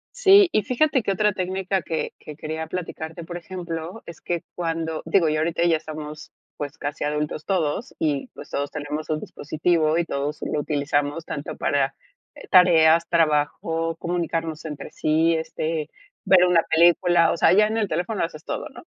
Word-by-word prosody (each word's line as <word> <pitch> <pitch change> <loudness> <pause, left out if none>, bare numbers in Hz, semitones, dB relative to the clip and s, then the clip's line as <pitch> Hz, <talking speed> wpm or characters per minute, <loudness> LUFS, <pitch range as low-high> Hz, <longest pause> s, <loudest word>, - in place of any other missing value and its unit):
Sí, 400 -5 +7
y 215 - +2
fíjate 260 +3 +1
que 200 - 0
otra 210 +2 +2
técnica 190 +1 -1
que 160 0 -3
que 150 - -10
quería 160 +1 -5
platicarte, 165 -1 -6
por 175 +1 -6
ejemplo, 175 +1 -6
es 170 - -10
que 175 -1 -3
cuando 165 -2 -3
digo, 170 -5 +3
yo 155 0 0
ahorita 170 +1 0
ya 165 -2 +4
estamos, 155 -1 -8 0.3
pues, 145 +1 -5
casi 145 -1 -4
adultos 150 +1 -2
todos 165 -7 -1
y, 145 -3 0
pues, 145 - -11
todos 140 0 -3
tenemos 150 +1 -5
un 155 -1 0
dispositivo, 155 +1 0
y 170 - +1
todos 145 0 -3
lo 150 - 0
utilizamos 145 +1 -1
tanto 145 0 -5
para, - - 0 0.4
eh, - - -13
tareas, 170 -3 +6
trabajo, 165 0 +1
comunicarnos 165 -2 -3
entre 150 -2 -6
sí, 160 +2 +2
este, 160 -1 -3 0.4
ver 185 -2 +6
una 175 -2 +4
película. 170 0 +4
O - - -1
sea, 165 - +5
ya 210 +2 +5
en 220 +1 -2
el 215 -3 +1
teléfono 180 +6 -2
haces 155 -2 -5
todo, - - -4
¿no? - - -13
165 Hz, 175 wpm, -23 LUFS, 155-180 Hz, 0.4 s, Sí